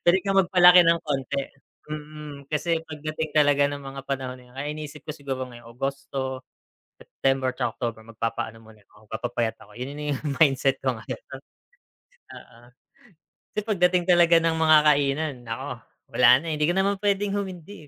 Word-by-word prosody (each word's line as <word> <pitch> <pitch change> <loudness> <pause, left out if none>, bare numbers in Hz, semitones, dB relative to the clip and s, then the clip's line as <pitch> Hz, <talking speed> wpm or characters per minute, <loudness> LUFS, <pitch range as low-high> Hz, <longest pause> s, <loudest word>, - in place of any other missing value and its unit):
puwede 175 +2 +4
kang 195 -1 +4
magpalaki 180 -1 +7
ng 170 -1 +5
konti 140 -1 -2 0.5
mm, 150 -1 -8
kasi 165 +2 0
pagdating 155 0 -4
talaga 145 -1 +4
ng 145 0 -6
mga 135 0 -7
panahon 130 -2 -4
na - - -17
yun 125 - -20
kaya 145 +2 -3
iniisip 150 -1 -8
ko 150 - -5
siguro 135 -3 -4
ngayon 120 -2 -13
Agosto, 135 -1 -3 0.6
September, 135 -1 -1
'tsaka 115 - -1
October, 115 -2 -3
magpapaano 115 0 -4
muna 110 -2 -18
ko, 105 +1 -21
magpapayat 115 +1 -2
ako - - -15
yun 135 +3 -5
na 150 0 -3
yung 140 0 -3
mindset 135 -2 +2
ko 130 - +2
ngayon - - -7
'no. - - -7 1.0
Oo. 115 - -17 1.0
Kasi - - +2
pagdating 180 -4 +2
talaga 175 -2 +6
ng 165 0 +2
mga 160 -1 +5
kainan, 145 0 +2
nako 125 0 -5 0.3
wala 125 +3 +6
na 165 - -3
hindi 150 0 +1
ko 175 - +1
naman 195 +1 +1
puwedeng 200 0 +1
humindi, 190 -4 -6
145 Hz, 170 wpm, -25 LUFS, 130-165 Hz, 1.0 s, magpalaki